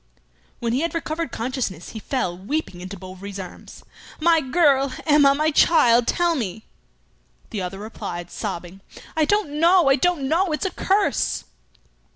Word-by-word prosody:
When 235 -1 -2
he 255 - +1
had 335 +2 -2
recovered 325 -2 -3
consciousness, 230 - -4
he 220 - -7
fell, 210 -7 -2
weeping, 195 - -4
into 190 +2 -7
Bovary's 190 +2 -9
arms: 185 -2 -10 0.4
"My 330 0 +4
girl! 275 -2 +3
Emma! 290 -3 +5
my 310 +2 +1
child! 245 -7 +4
tell 345 -1 +2
me 220 - -4 0.4
" 60 0 -37
The 210 - -3
other 180 +1 -5
replied, 175 -4 -7
sobbing, 175 +2 -6 0.3
"I 315 -1 +3
don't 335 -6 0
know! 340 -2 +5
I 270 - +6
don't 350 -6 +1
know! 335 +3 +1
It's 305 - -2
a 385 - -1
curse!" 380 -4 0
270 Hz, 160 wpm, -23 LUFS, 195-320 Hz, 0.4 s, I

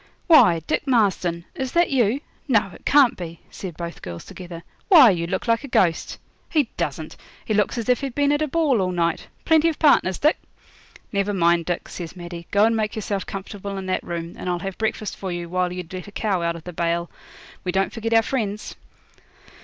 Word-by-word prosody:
'Why, 180 - +6
Dick 290 - -1
Marston, 185 -8 +1
is 265 -7 -4
that 345 -2 +3
you? 250 0 +2 0.3
No, 210 -7 +2
it - - -15
can't 280 -4 +5
be,' 170 -2 -7
said 180 -5 -7
both 170 -1 -6
girls 85 -1 -7
together. 175 -2 -9 0.2
'Why, 305 - +8
you 170 -2 -2
look 190 +5 -3
like 230 +3 +2
a - - -6
ghost. 175 -9 +1 0.3
He 295 -7 +1
doesn't; 160 -3 -4 0.3
he 215 - -1
looks 210 +4 +1
as 230 - -3
if 250 +1 +2
he'd 270 -3 -4
been 285 0 +2
at 290 +1 +1
a 310 - +1
ball 290 -7 +2
all 185 -1 0
night. 170 -2 -1 0.2
Plenty 320 0 +4
of 315 - -4
partners, 235 - +4
Dick?' 305 +2 +2 0.7
'Never 200 0 0
mind, 170 -2 +3
Dick,' 175 - -3
says 170 -1 -7
Maddie; 175 -1 -8
'go 205 +1 +4
and 230 0 +2
make 215 -1 -1
yourself 200 -3 -3
comfortable 195 0 -6
in 190 - -5
that 185 - -1
room, 170 0 -5
and 180 - -4
I'll 175 - 0
have 195 +2 -6
breakfast 220 -1 -2
for 190 -2 -4
you 175 -1 -4
while 180 +1 0
you'd 180 -1 -7
let 185 +1 -6
a - - -10
cow 200 -3 -1
out 170 0 -1
of 165 - -10
the 180 - -8
bail. 170 +1 -1 0.5
We 180 - -1
don't 190 +1 0
forget 225 -1 -3
our 225 - +6
friends.' 215 -5 -3
195 Hz, 215 wpm, -23 LUFS, 175-235 Hz, 0.7 s, Why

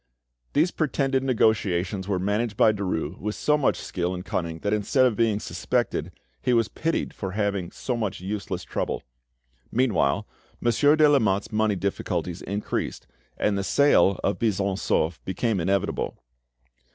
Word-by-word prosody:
These 165 +5 +3
pretended 135 -3 0
negotiations 105 -6 +1
were 100 -2 0
managed 105 +3 -1
by 110 - +6
Derues 90 -5 -3
with 105 +1 -3
so 150 - +2
much 145 -3 +2
skill 90 0 -3
and 90 +1 -7
cunning 85 -4 -2
that 105 - 0
instead 105 +5 +3
of 120 -4 +2
being 110 -2 +2
suspected, - - -1 0.3
he 125 - +1
was 115 -2 +3
pitied 165 +1 -2
for 95 -2 -5
having 100 -4 -1
so 125 - -3
much 110 -5 -2
useless 95 -1 -4
trouble. - - -3 0.7
Meanwhile, 110 - +1 0.3
Monsieur 145 +6 +4
de 155 -1 +6
Lamotte's 110 -7 +2
money 110 -1 +2
difficulties 90 -2 -2
increased, 100 +2 -3 0.3
and 105 - +1
the - - -1
sale 100 -4 +4
of 100 - 0
Buisson 100 -3 +1
Souef 80 -3 0
became 100 +2 -1
inevitable. 95 +3 -1
105 Hz, 150 wpm, -25 LUFS, 95-120 Hz, 0.7 s, by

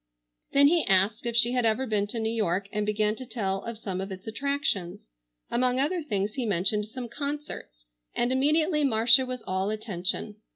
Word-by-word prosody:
Then 280 0 +7
he 335 +2 +3
asked 200 +4 +3
if 235 - -2
she 235 +1 +4
had 250 -1 +1
ever 225 +4 +2
been 210 -4 0
to 230 +3 -4
New 220 0 -1
York 200 -3 0
and 210 -1 -2
began 210 0 +1
to 260 - -6
tell 195 -5 -2
of 230 -1 -6
some 190 -4 -4
of 195 +1 -5
its 190 +1 -8
attractions. 220 -7 -2 0.4
Among 250 +1 +1
other 335 +6 +1
things 210 -8 -2
he 260 - -3
mentioned 205 +2 0
some 245 +2 -6
concerts, 280 - -6 0.3
and 240 +1 +1
immediately 300 +4 +2
Marcia 245 +1 +5
was 250 -2 -5
all 190 +1 -1
attention. 210 0 -3
225 Hz, 190 wpm, -27 LUFS, 200-260 Hz, 0.4 s, Then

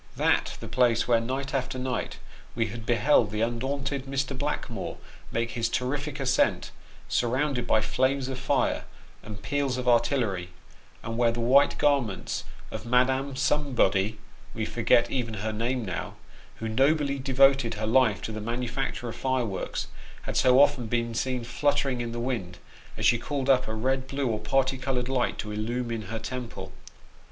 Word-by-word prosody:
That - - +1
the - - -7
place 120 -3 +2
where 120 -2 +4
night 135 +4 -3
after 130 -1 -1
night 130 0 -3 0.4
we 115 -1 +1
had 110 0 -8
beheld 120 -1 +4
the 105 +1 -3
undaunted 135 +4 -2
Mr. 135 0 -1
Blackmore 130 -6 -3 0.3
make 115 +1 -1
his 115 -1 -1
terrific 145 +4 -2
ascent, 135 -1 +1 0.4
surrounded 125 0 0
by 110 - +3
flames 130 +4 +1
of 130 -1 -4
fire, 135 +1 0 0.4
and 105 -2 -9
peals 140 0 0
of 125 -1 -4
artillery, 120 -7 +2 0.5
and 115 +1 -4
where 120 -1 +4
the 120 - -4
white 130 +5 +4
garments 135 -10 0 0.3
of - - -5
Madame 130 +3 +2
Somebody 120 -8 +1 0.4
(we 110 -1 -1
forget 120 +1 +2
even 120 -4 -2
her 110 +1 -3
name 120 +2 -1
now), 90 -3 -4 0.4
who 115 - -5
nobly 140 +4 +2
devoted 135 -2 +4
her 110 +1 -3
life 110 -2 +3
to - - -3
the 110 0 -5
manufacture 120 +2 -3
of 115 - -5
fireworks, 125 -8 -2 0.4
had - - -5
so 130 0 +5
often 140 -4 +4
been 115 0 -1
seen 125 +1 -1
fluttering 135 +1 0
in 120 -1 -3
the 120 - -4
wind, 115 -8 -3 0.4
as - - -1
she 120 - +5
called 140 +1 0
up 130 -1 +3
a 110 - -3
red, 130 +3 0
blue, 140 0 -2
or 110 -4 0
party 130 +4 +1
coloured 130 -2 -1
light 130 -2 0
to 105 - -5
illumine 115 0 -3
her 115 - -3
temple! 125 +2 -6
125 Hz, 165 wpm, -27 LUFS, 115-135 Hz, 0.5 s, so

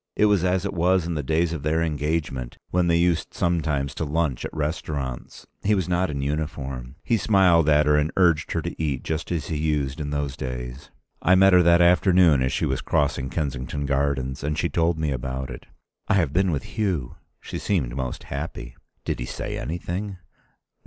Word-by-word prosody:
It 105 - +4
was 100 -4 +3
as 90 +1 +1
it 100 - -2
was 90 0 +2
in 85 - -2
the 75 - -1
days 80 +4 +1
of 80 - -4
their 80 +3 +1
engagement, 75 -5 -2
when 90 -1 +2
they 85 -1 +3
used 85 -1 +1
sometimes 75 -5 0
to 80 - -3
lunch 75 -4 -1
at - - -4
restaurants. 75 -4 -4 0.2
He 105 +1 +2
was 95 -3 -1
not 90 +1 +1
in 70 -2 -3
uniform. 70 -4 -4
He 115 - +2
smiled 90 -6 +4
at 75 0 +5
her 75 0 +4
and 75 +2 +1
urged 85 -4 +3
her 85 - -1
to 85 0 -5
eat, 70 -5 -1
just 80 +1 -3
as 85 -3 -2
he 80 - -1
used 75 -3 -1
in 75 - -3
those 70 -2 -2
days.... 60 0 -6 0.3
I 90 - +5
met 95 0 +6
her 90 - +7
that 85 0 +5
afternoon 90 -4 +5
as 65 +1 +1
she - - 0
was 65 -1 -1
crossing 70 -2 0
Kensington 70 -2 -3
Gardens, 70 -1 -1
and 75 +1 -1
she 85 - 0
told 85 +2 +1
me 80 -2 -1
about 65 +1 -4
it. - - -10 0.4
"I - - +3
have 85 -8 +1
been 95 +1 +2
with 75 -6 -1
Hugh." 90 - -2 0.2
She - - -6
seemed 70 -12 -1
most 65 -2 -4
happy. - - -6 0.3
"Did - - -2
he - - -4
say - - -4
anything?" 90 +4 -4
75 Hz, 200 wpm, -24 LUFS, 70-85 Hz, 0.4 s, her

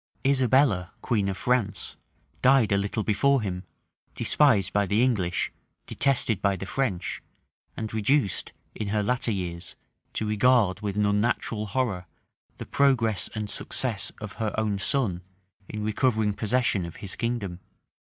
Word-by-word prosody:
Isabella, 130 -8 +3
queen 105 -5 +1
of 95 - -3
France, 120 -3 0 0.5
died 130 -4 +5
a 100 - +4
little 100 +2 -2
before 130 +5 +2
him, 90 -2 -4 0.5
despised 120 -11 +3
by 100 -1 +2
the 105 +5 +2
English, 95 -9 0 0.3
detested 120 -7 +1
by 100 -1 +2
the 95 - -6
French, 105 -6 -2 0.6
and 110 -1 -4
reduced, 110 0 +1 0.2
in 105 - -4
her 105 +1 0
latter 125 +2 +1
years, 90 -4 -4 0.4
to 110 - -2
regard 105 -3 +3
with 100 -2 -3
an 105 0 +2
unnatural 105 +1 0
horror 100 -7 -1 0.5
the - - -7
progress 120 -7 +2
and 105 -1 -3
success 110 0 -1
of 105 -2 -7
her 110 -2 0
own 105 -2 0
son, 100 -7 0 0.5
in 105 -1 -4
recovering 110 -1 +1
possession 110 -2 +1
of 85 -1 -7
his 100 -2 -5
kingdom. 115 -7 -3
105 Hz, 145 wpm, -26 LUFS, 100-125 Hz, 0.6 s, died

